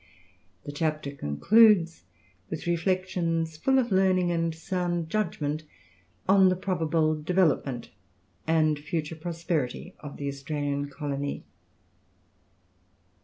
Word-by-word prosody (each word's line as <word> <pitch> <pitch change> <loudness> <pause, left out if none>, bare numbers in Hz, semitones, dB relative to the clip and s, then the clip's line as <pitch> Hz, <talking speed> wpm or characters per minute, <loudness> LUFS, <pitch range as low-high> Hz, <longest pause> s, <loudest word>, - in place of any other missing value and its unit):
The 145 - -6
chapter 155 -1 -2
concludes 170 - +4 0.4
with - - -5
reflections 170 -2 0
full 265 +12 +2
of 245 -4 +1
learning 185 -2 +3
and 165 -1 0
sound 175 -1 -2
judgment 155 -7 -1 0.7
on 190 0 +6
the 185 - +2
probable 160 -4 0
development 150 -8 +1 0.6
and 155 -2 +3
future 155 +1 -3
prosperity 165 -1 -3
of 145 -1 -9
the 140 - -4
Australian 140 0 -3
colony. 140 -1 -4
165 Hz, 100 wpm, -27 LUFS, 145-185 Hz, 0.7 s, on